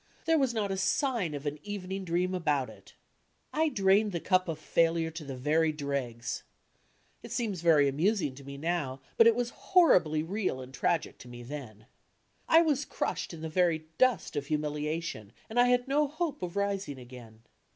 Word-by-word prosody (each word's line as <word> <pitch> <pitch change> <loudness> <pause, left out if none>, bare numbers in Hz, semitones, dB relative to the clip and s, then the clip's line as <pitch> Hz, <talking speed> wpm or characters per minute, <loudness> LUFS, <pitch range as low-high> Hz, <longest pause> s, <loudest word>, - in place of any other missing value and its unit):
There 325 -1 +3
was 265 -3 +2
not 210 -4 -1
a 190 - -2
sign 190 - 0
of 145 +1 -7
an 145 +1 -3
evening 195 -1 -5
dream 180 +2 0
about 145 -7 0
it! - - -17 0.6
I 315 +1 +2
drained 200 -2 +3
the 170 - -1
cup 185 +1 +2
of 165 -2 -3
failure 165 +1 +1
to 160 0 -7
the 135 -2 -6
very 155 +5 +2
dregs. 140 -6 -3 0.8
It 235 - -10
seems 225 -7 -2
very 155 -4 +5
amusing 155 +1 +1
to 140 +2 -12
me 140 0 -8
now, 150 -4 -2 0.2
but 230 - +7
it 230 - +5
was 240 0 -1
horribly 180 - +3
real 185 -5 -2
and 130 0 -9
tragic 160 +5 -1
to - - -12
me 120 0 -9
then. 120 -5 -8 0.6
I 325 +1 +7
was 295 -3 +1
crushed - - -3
in 165 -2 -9
the 160 - -3
very 160 -1 +1
dust 255 -9 +2
of 140 -1 -3
humiliation 150 -6 -3
and 230 +2 -1
I 245 - +6
had 245 0 +2
no 290 +2 +2
hope 305 0 -3
of 180 0 -5
rising 200 -7 -1
again. 120 -3 -12
170 Hz, 185 wpm, -30 LUFS, 145-210 Hz, 0.8 s, but